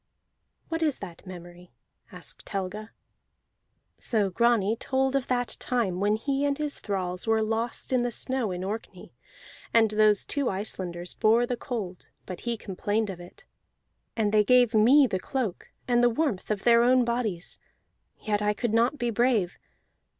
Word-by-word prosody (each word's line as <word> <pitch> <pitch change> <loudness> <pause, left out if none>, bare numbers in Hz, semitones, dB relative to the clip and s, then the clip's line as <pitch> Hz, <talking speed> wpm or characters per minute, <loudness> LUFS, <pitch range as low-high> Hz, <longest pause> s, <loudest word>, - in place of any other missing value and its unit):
"What 325 0 -2
is 305 -4 +1
that 180 -2 -10
memory?" 175 -1 -11 0.4
asked - - -9
Helga. 200 +2 -4 1.1
So 210 -5 0
Grani 230 -1 +2
told 265 +2 0
of 270 -2 0
that 245 -1 0
time 220 -8 -1
when 205 +2 +2
he 275 +5 -1
and 285 -1 +1
his 300 -1 -2
thralls 185 -1 -3
were 220 0 +3
lost 225 +4 -2
in 250 - +3
the 245 - 0
snow 250 -1 -1
in 180 0 -4
Orkney, 210 +4 -6 0.6
and 225 -2 +4
those 210 -1 +3
two 280 -3 0
Icelanders 180 -3 -4
bore 230 +3 +3
the 245 - -2
cold, 215 -8 -6 0.2
but 180 -2 -7
he 235 - -1
complained 205 +1 -2
of 180 - -9
it. 175 0 -14 0.7
"And 210 -2 +1
they 210 -1 +5
gave 245 +1 +4
me 250 +7 +6
the 190 -7 -1
cloak 235 -5 -4 0.2
and 240 -1 +3
the 245 - +6
warmth 240 -5 -1
of 210 -2 -2
their 235 -1 +6
own 250 +1 +4
bodies, 230 -7 -3 0.6
yet 210 -1 -1
I 210 0 +1
could 235 -1 -2
not 235 +6 +2
be 240 -3 -1
brave. 225 -6 +1
220 Hz, 165 wpm, -27 LUFS, 195-245 Hz, 1.1 s, me